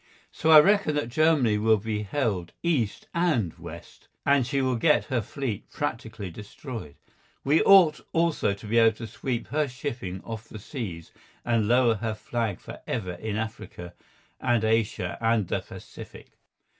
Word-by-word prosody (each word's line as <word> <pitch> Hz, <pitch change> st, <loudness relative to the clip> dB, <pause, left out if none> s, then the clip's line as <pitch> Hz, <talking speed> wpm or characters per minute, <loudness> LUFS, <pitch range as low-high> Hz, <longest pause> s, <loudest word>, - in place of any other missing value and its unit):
So 160 Hz, -, -1 dB
I 155 Hz, -1 st, +11 dB
reckon 195 Hz, -2 st, +3 dB
that 145 Hz, -5 st, -1 dB
Germany 140 Hz, -6 st, +3 dB
will 110 Hz, 0 st, +4 dB
be 105 Hz, 0 st, -3 dB
held 100 Hz, -6 st, -2 dB
east 140 Hz, -12 st, 0 dB
and 155 Hz, -, +1 dB
west, 85 Hz, 0 st, -11 dB, 0.2 s
and 140 Hz, -1 st, +4 dB
that -, -, -6 dB
she 140 Hz, -1 st, 0 dB
will 130 Hz, -1 st, +1 dB
get 150 Hz, +5 st, +3 dB
her 120 Hz, -, +2 dB
fleet 120 Hz, -2 st, -5 dB
practically 110 Hz, -8 st, -4 dB
destroyed. 105 Hz, -, -8 dB, 0.5 s
We 150 Hz, +4 st, +3 dB
ought 180 Hz, -6 st, +6 dB
also 165 Hz, -11 st, +1 dB
to 100 Hz, -, -13 dB
be 115 Hz, +3 st, +2 dB
able 115 Hz, -1 st, +4 dB
to 115 Hz, -, -6 dB
sweep 120 Hz, +2 st, -4 dB
her 150 Hz, +3 st, +1 dB
shipping 125 Hz, -8 st, -5 dB
off 115 Hz, 0 st, -7 dB
the -, -, -8 dB
seas, 100 Hz, -, -7 dB, 0.3 s
and 115 Hz, -3 st, +1 dB
lower 120 Hz, 0 st, +4 dB
her 110 Hz, +1 st, -3 dB
flag 110 Hz, -3 st, -3 dB
for -, -, -10 dB
ever 90 Hz, -5 st, -3 dB
in 105 Hz, +4 st, -4 dB
Africa 110 Hz, -6 st, -6 dB, 0.5 s
and 120 Hz, -3 st, +1 dB
Asia 110 Hz, -5 st, 0 dB
and 115 Hz, -4 st, +2 dB
the -, -, 0 dB
Pacific. -, -, -12 dB
115 Hz, 165 wpm, -26 LUFS, 105-140 Hz, 0.5 s, I